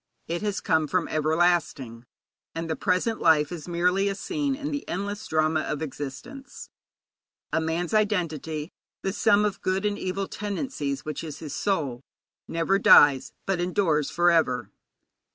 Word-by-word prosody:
It 170 +1 -2
has 205 -2 -2
come 160 -1 +1
from 180 +2 0
everlasting, 155 -7 0 0.5
and 165 0 -3
the 160 - -1
present 190 +5 0
life 150 -2 +4
is 170 -3 -7
merely 180 +3 +1
a 195 - -2
scene 285 - -2
in 290 +2 -5
the 285 -1 -3
endless 200 +2 -4
drama 155 0 +1
of 150 0 -3
existence. 150 - -8 0.8
A 160 - +2
man's 165 +3 -2
identity, 165 -7 -1 0.3
the 195 - -1
sum 210 -1 +3
of 205 - -2
good 190 +2 0
and 205 0 -1
of - - -7
evil 190 +1 -2
tendencies, 200 - -4
which 155 +1 -4
is 155 -3 -6
his 150 -3 -7
soul, 145 -12 -1 0.5
never 165 +4 +1
dies, 145 -8 +6
but 190 -2 0
endures 175 -5 +1
for 175 0 +3
ever. 140 -7 +1
175 Hz, 155 wpm, -26 LUFS, 155-200 Hz, 0.8 s, dies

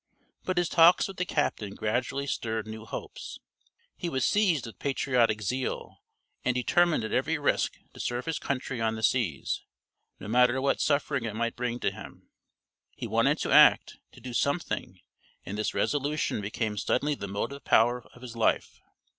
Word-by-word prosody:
But 185 -1 -1
his 175 -1 +2
talks 170 +2 +6
with 195 - -9
the 180 - -2
captain 105 -9 -1
gradually 125 +5 -1
stirred 110 -5 -2
new 110 0 -8
hopes. - - -7 0.6
He 175 - -4
was 130 -5 0
seized 185 - +2
with 115 -5 -10
patriotic 125 -6 +1
zeal 130 +6 -3 0.4
and 125 - +1
determined 170 +3 +2
at 110 - -4
every 155 +5 +1
risk 145 - 0 0.2
to - - -13
serve 120 +1 -2
his 165 -2 -2
country 130 -3 -3
on 110 0 +1
the 110 - -6
seas, 100 - 0 0.6
no 100 - -8
matter 125 +3 +4
what 135 +1 +1
suffering 140 -3 +1
it 110 -2 -4
might 115 +1 -1
bring 120 0 -2
to - - +1
him. - - -12 0.6
He - - -5
wanted - - +2
to - - -2
act, - - +6
to - - -14
do 125 -1 -8
something, 140 - -1 0.5
and 100 - -5
this 105 0 -2
resolution 145 -5 0
became 105 +1 -3
suddenly 145 +9 +1
the 100 -8 -5
motive 105 +8 -4
power 120 +2 +3
of 125 - -15
his 120 -2 -8
life. 115 - 0
125 Hz, 170 wpm, -28 LUFS, 110-145 Hz, 0.6 s, talks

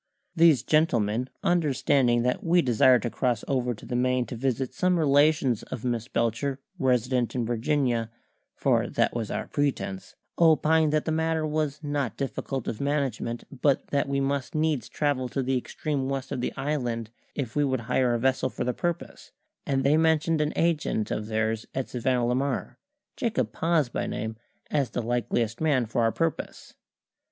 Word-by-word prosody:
These 160 -8 +5
gentlemen, 125 -6 +1
understanding 140 -7 +2
that 125 0 0
we 175 +1 +3
desired 125 0 +4
to 120 - -2
cross 120 -3 0
over 125 -3 0
to - - -13
the 120 - -4
Main 125 0 +1
to 120 - -7
visit 130 +1 -1
some 180 -1 +2
relations 145 -5 +3
of 125 - -7
Miss 120 -2 -1
Belcher 125 +4 -1 0.2
resident 125 -1 +1
in 120 -2 0
Virginia 120 -1 0 0.5
(for - - +2
that - - +1
was 115 -3 -3
our - - -3
pretence), 100 -9 -2 0.2
opined 160 -1 +4
that 155 0 +1
the 160 - -1
matter 160 0 0
was 155 -1 -2
not 145 -6 -2
difficult 135 -1 -3
of 110 - -3
management, 135 -5 -1 0.2
but 140 -2 +2
that 140 -1 0
we 140 0 0
must 140 0 -2
needs 155 -6 0
travel 140 -4 -1
to 135 +2 -2
the 130 +1 0
extreme 135 +2 -2
west 135 -1 -3
of 130 -3 -2
the - - -1
island 125 -6 -2 0.2
if 130 -6 -4
we 145 - +3
would 130 -3 0
hire 125 +1 +1
a - - -1
vessel 130 +1 +1
for - - -4
the 125 0 -1
purpose, 175 +3 -4 0.4
and 135 -1 +1
they 145 +3 +4
mentioned 160 0 +2
an 150 0 0
agent 155 -10 0
of 105 - -2
theirs 110 0 -1
at 130 -1 -2
Savannah 125 0 0
la 120 - +1
Mar 135 +1 -2 0.4
Jacob 130 - -1
Paz 165 -4 +2
by 120 - -3
name 110 +1 -4 0.4
as 140 -5 +1
the 120 - -3
likeliest 120 0 -1
man 140 -6 +2
for 115 +2 -1
our 115 0 +3
purpose. 165 +2 -3
130 Hz, 175 wpm, -27 LUFS, 120-150 Hz, 0.5 s, These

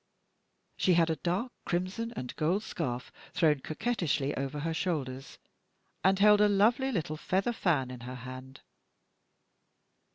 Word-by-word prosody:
She 180 - +3
had 165 -1 +4
a 160 - -1
dark 180 - -1
crimson 185 +7 -2
and 125 - -5
gold 180 +7 +1
scarf 125 - -4 0.2
thrown 150 -4 +3
coquettishly 155 - -1
over 140 +2 -3
her 165 +2 -1
shoulders, 135 -7 -3 0.7
and 190 +1 +4
held 210 +1 +6
a 210 - +5
lovely 230 +7 +3
little 155 -8 -2
feather 190 +8 0
fan 145 - +1
in 125 - -8
her 125 +2 -7
hand. 130 +2 -9
165 Hz, 135 wpm, -30 LUFS, 135-200 Hz, 0.7 s, held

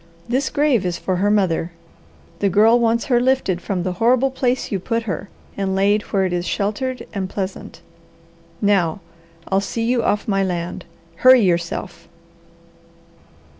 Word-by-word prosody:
This 260 +3 0
grave 285 -8 +2
is 175 -2 -2
for 185 0 -2
her 200 +3 +1
mother. 180 -5 +1 0.7
The 200 - +2
Girl 220 +5 +5
wants 235 +2 +1
her 250 -5 +2
lifted 250 -9 +1
from 185 -2 -2
the 185 - -1
horrible 255 +3 +3
place 255 -1 -1
you 195 - -1
put 230 +5 -2
her, 195 -2 -5 0.3
and 195 -1 -2
laid 200 +2 +2
where 195 -1 +2
it 180 - -2
is 175 0 -2
sheltered 215 +8 -2
and 190 -3 -3
pleasant. 190 -1 -6 0.8
Now, 195 -5 +2 0.5
I'll 195 0 +2
see 225 +3 -3
you 240 +1 +1
off 205 -1 0
my 195 -2 +1
land. 175 -2 -4 0.3
Hurry 255 +4 +7
yourself!" 175 -1 -2
200 Hz, 155 wpm, -20 LUFS, 185-235 Hz, 0.8 s, Hurry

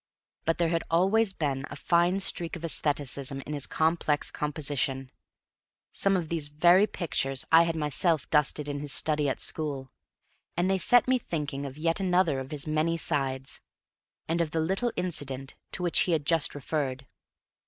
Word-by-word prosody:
But 165 - +1
there 170 -1 +1
had 165 0 0
always 195 +6 +3
been 140 -7 -2
a - - -7
fine 175 +5 +2
streak 170 -3 0
of 170 - -9
æstheticism 140 -4 -1
in 150 - -6
his 145 -2 -2
complex 160 -2 +1
composition; 140 -3 -2 0.8
some 195 -1 +2
of 170 -3 -3
these 160 -2 -2
very 175 +7 +4
pictures 135 -8 -2
I 165 0 +8
had 165 -1 -1
myself 155 +1 +1
dusted 150 0 +1
in 145 -1 -3
his 145 -1 -6
study 150 -1 0
at - - -3
school; 140 -4 -3 0.7
and 180 +2 +2
they 190 - +1
set 245 +7 +5
me 255 0 +3
thinking 145 - -4
of 135 +1 -10
yet 165 +3 0
another 180 -6 +2
of 130 0 -7
his 145 -2 -3
many 155 +2 0
sides 135 -4 -1 0.7
and 170 +1 0
of 165 - 0
the 160 - -2
little 190 +9 0
incident 140 -7 -3 0.2
to 180 - -2
which 175 - +2
he 175 - +3
had 150 -3 0
just 165 -2 +2
referred. 135 -2 -3
155 Hz, 175 wpm, -28 LUFS, 140-170 Hz, 0.8 s, I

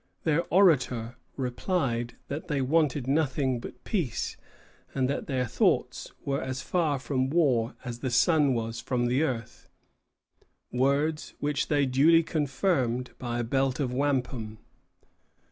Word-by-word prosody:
Their 160 +1 +1
orator 130 - +3 0.2
replied 125 -2 -1
that 145 +3 -5
they 145 -2 0
wanted 145 -1 +1
nothing 135 -3 +1
but - - -10
peace, 175 - -2 0.6
and 130 -2 +1
that 140 - -3
their 130 -2 0
thoughts 115 - 0
were 140 0 -1
as 130 0 -4
far 160 -6 +1
from 130 0 -1
war 135 -8 +2
as 120 -1 -5
the 130 - -2
sun 145 +2 +3
was 115 0 -3
from 120 0 -1
the 125 +4 +2
earth, 125 -5 -3 1.0
words 140 +5 0
which 145 -1 -1
they 145 -2 +2
duly 150 +6 +5
confirmed 135 -5 0
by 120 -1 -3
a - - -2
belt 135 +3 0
of 130 -4 -1
wampum. 125 -5 -1
135 Hz, 135 wpm, -28 LUFS, 125-150 Hz, 1.0 s, duly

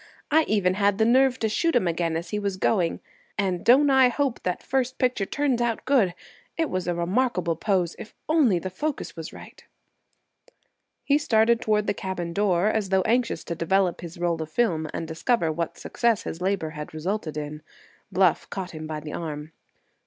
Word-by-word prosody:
"I 315 +1 +5
even 195 -4 +2
had 200 0 +2
the 220 - +3
nerve 260 +2 +4
to 225 - 0
shoot 330 +10 +1
him 185 - +3
again 165 -1 0
as 170 - -6
he 210 - -1
was 200 -2 -2
going. 185 -3 +1 0.4
And 185 -4 -1
don't 275 +4 +6
I 265 -2 +6
hope 270 0 -1
that 180 -1 -3
first 260 -1 -1
picture 250 -6 0
turns 275 -3 0
out 235 -2 -1
good! 230 -11 +3 0.4
It 325 -2 0
was 185 -1 -2
a 175 - 0
remarkable 180 -1 0
pose, 180 -1 0
if 220 - -10
only 295 - +4
the 185 +2 -4
focus 290 - -4
was 165 -1 -7
right." - - -13 1.4
He 285 +1 +3
started 235 -5 +3
toward 215 -3 +1
the 205 - +1
cabin 180 -4 -4
door 190 -2 +2
as 215 -3 0
though 190 -1 +3
anxious 240 +4 0
to - - -4
develop 180 +2 +1
his 170 -1 -8
roll 170 -1 -1
of 160 - -5
film 160 -5 0
and 165 - -4
discover 165 +2 0
what 165 +1 -3
success 235 -3 0
his 165 - -6
labor 185 -4 -1
had 150 0 -8
resulted 165 -1 -3
in. 150 0 -5 0.5
Bluff 185 -4 +2
caught 185 -2 -5
him 155 -1 -7
by 155 -1 -4
the 150 0 -7
arm. 155 -2 -5
190 Hz, 190 wpm, -25 LUFS, 170-235 Hz, 1.4 s, don't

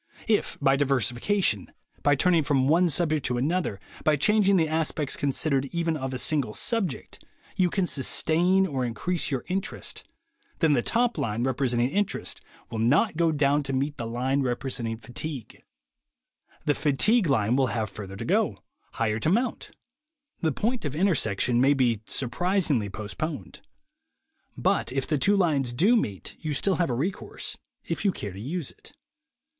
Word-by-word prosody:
If, 215 -2 +1
by 135 -1 +3
diversification, 130 - +1 0.3
by 145 0 +4
turning 170 +3 +3
from 135 -3 +1
one 170 +4 +4
subject 155 -2 +1
to 125 -1 -1
another, 150 - -1 0.2
by 155 - +4
changing 200 +5 +4
the 160 -2 +2
aspects 155 -2 -1
considered 140 0 0
even 170 -1 -1
of 135 -3 -4
a 130 - -3
single 135 -5 0
subject, 200 - -2 0.3
you 180 -2 +2
can 190 +1 0
sustain 175 +5 +2
or 135 -7 -2
increase 150 +9 -1
your 135 -4 -3
interest, 190 +1 -3 0.5
then 160 -3 +3
the 125 - +2
top 240 - +1
line 110 +2 -1
representing 125 -2 +1
interest 205 +3 -2 0.3
will 115 - -3
not 150 - +3
go 165 0 +2
down 145 -1 +2
to 135 -1 -4
meet 140 +3 -1
the 115 - -4
line 130 +4 0
representing 120 -3 -2
fatigue; 125 +1 -7 1.0
the 145 - +3
fatigue 170 - +2
line 120 -4 +2
will 135 -1 +3
have 110 -3 -2
further 100 -1 -8
to - - -6
go, - - 0 0.3
higher 110 -1 -1
to 155 - +1
mount; 235 +7 0 0.7
the 160 - +1
point 230 - -1
of 145 -2 -3
intersection 125 - +2
may 140 +2 +4
be 120 -5 +1
surpris 175 +8 0
ingly 105 -7 0
postponed. 135 +10 -5 1.0
But 195 +2 +1
if 135 0 -1
the 150 -3 0
two 205 +7 +3
lines 145 -9 +1
do 195 - +4
meet, 100 - -2
you 155 - -5
have - - +1
still 185 -4 +1
a 170 - +1
recourse, 150 +11 -3 0.2
if - - -4
you 200 - +3
care 105 - -6
to 95 - -8
use 155 +5 -2
it. - - -17
145 Hz, 165 wpm, -26 LUFS, 125-175 Hz, 1.0 s, by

